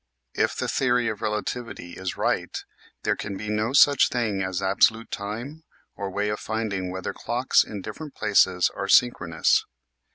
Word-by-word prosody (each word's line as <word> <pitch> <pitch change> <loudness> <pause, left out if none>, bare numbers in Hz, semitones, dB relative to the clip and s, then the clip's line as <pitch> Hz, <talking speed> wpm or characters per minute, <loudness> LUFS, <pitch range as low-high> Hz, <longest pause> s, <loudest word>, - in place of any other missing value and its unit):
If - - 0
the - - -2
theory 125 -3 +1
of 110 -1 -5
relativity 105 -3 -4
is 95 +1 -5
right - - -1 0.5
there - - +1
can 100 -1 -5
be 105 - -6
no 105 +2 0
such 140 -1 +6
thing 110 -6 -1
as 95 -1 -2
absolute 110 +4 +2
time 120 +10 -6 0.3
or 100 -1 -4
way 100 +2 -1
of 105 - -2
finding 105 -4 -3
whether 95 0 -4
clocks 125 +2 +2
in 100 -3 -7
different 155 -3 -8
places 95 -4 +3
are 100 - -3
synchronous. 90 -9 +3
105 Hz, 160 wpm, -25 LUFS, 95-120 Hz, 0.5 s, such